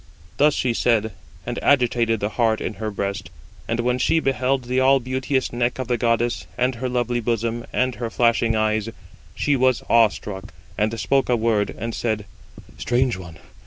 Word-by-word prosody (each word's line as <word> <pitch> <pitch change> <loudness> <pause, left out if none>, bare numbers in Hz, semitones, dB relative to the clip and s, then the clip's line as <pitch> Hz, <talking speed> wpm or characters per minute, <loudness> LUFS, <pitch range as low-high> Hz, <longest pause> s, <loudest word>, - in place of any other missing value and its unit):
Thus 150 +1 +4
she 125 -2 0
said, 110 -2 +1 0.3
and - - -3
agitated 120 -5 +2
the 105 - 0
heart 110 0 +1
in - - -3
her 110 - -1
breast: 100 -2 -4 0.4
and 115 +1 -1
when 125 +1 0
she 165 - +3
beheld 135 -2 0
the 125 +1 0
all 135 +1 +5
beauteous 130 +1 -2
neck 120 +1 0
of 130 -2 -4
the 120 - +1
goddess, 120 0 0
and 125 +1 +1
her 125 +2 -4
lovely 120 -1 0
bosom, 115 0 -2
and 130 0 +1
her 120 -1 -4
flashing 115 -1 +2
eyes, 110 0 0 0.5
she 145 - +1
was 130 -1 +2
awe 115 -1 +7
struck, 100 -1 -8 0.2
and 110 +2 -1
spoke 135 -1 +1
a 125 - +4
word, 110 -3 +1
and 115 +2 -4
said: 110 -3 -2 0.5
"Strange 125 0 +1
one! 90 -3 -10
120 Hz, 180 wpm, -22 LUFS, 110-125 Hz, 0.5 s, awe